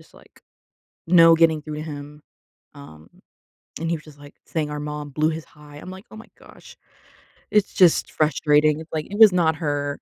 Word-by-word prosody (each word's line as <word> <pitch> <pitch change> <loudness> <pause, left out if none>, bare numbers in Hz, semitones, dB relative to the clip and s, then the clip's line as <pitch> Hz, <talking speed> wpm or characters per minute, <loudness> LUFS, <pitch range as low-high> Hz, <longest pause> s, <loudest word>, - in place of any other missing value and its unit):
just, - - -23
like, - - -21 0.7
no 165 -1 +6
getting 160 -2 +2
through 155 0 -7
to - - -5
him, 150 -1 -9 0.5
um, 80 - -14 0.7
and 165 - -3
he 170 - 0
was 155 - -15
just, 150 -2 -16
like, 145 0 -15
saying 155 -3 -3
our 150 - -5
mom 150 0 -6
blew 155 +3 0
his 160 0 -6
high. 150 -1 -17
I'm 150 - -11
like, 190 +2 -11
"Oh - - -12
my 220 - -12
gosh." - - -17 0.8
It's 210 -1 +1
just 180 -3 +3
frustrating, 150 0 +1
it's 160 - -14
like, 155 -1 -3
it 205 - -6
was 215 -4 +8
not 160 -3 +1
her. 145 -2 -3
155 Hz, 200 wpm, -22 LUFS, 150-165 Hz, 0.8 s, was